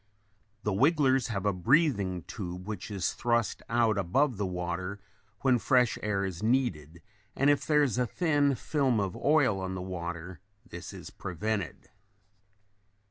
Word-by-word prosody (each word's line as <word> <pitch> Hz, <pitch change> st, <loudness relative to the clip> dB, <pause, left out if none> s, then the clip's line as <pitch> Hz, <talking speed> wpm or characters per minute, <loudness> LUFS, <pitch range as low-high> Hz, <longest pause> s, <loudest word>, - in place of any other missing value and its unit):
The 105 Hz, -, 0 dB
wigglers 135 Hz, -, +3 dB
have 100 Hz, -4 st, -3 dB
a 100 Hz, -, +2 dB
breathing 100 Hz, -, +2 dB
tube 90 Hz, -3 st, -6 dB
which 105 Hz, -2 st, -5 dB
is 100 Hz, -4 st, -1 dB
thrust 120 Hz, -1 st, 0 dB
out 115 Hz, -3 st, +2 dB
above 120 Hz, +7 st, +1 dB
the 100 Hz, -1 st, -1 dB
water 90 Hz, +2 st, -4 dB, 0.4 s
when 130 Hz, -3 st, +3 dB
fresh 125 Hz, 0 st, +3 dB
air 100 Hz, -2 st, 0 dB
is 90 Hz, -3 st, -5 dB
needed 90 Hz, -, 0 dB, 0.3 s
and 140 Hz, +2 st, +4 dB
if 145 Hz, -, 0 dB
there 150 Hz, -1 st, +4 dB
is 125 Hz, -5 st, 0 dB
a 125 Hz, -, +1 dB
thin 145 Hz, -2 st, +2 dB
film 135 Hz, -5 st, +1 dB
of 100 Hz, -3 st, -2 dB
oil 140 Hz, -9 st, +3 dB
on 95 Hz, 0 st, -4 dB
the 90 Hz, -, -4 dB
water 85 Hz, -1 st, -6 dB, 0.3 s
this 85 Hz, -7 st, -8 dB
is -, -, -10 dB
prevented. 100 Hz, +1 st, -4 dB
105 Hz, 150 wpm, -29 LUFS, 90-130 Hz, 0.4 s, and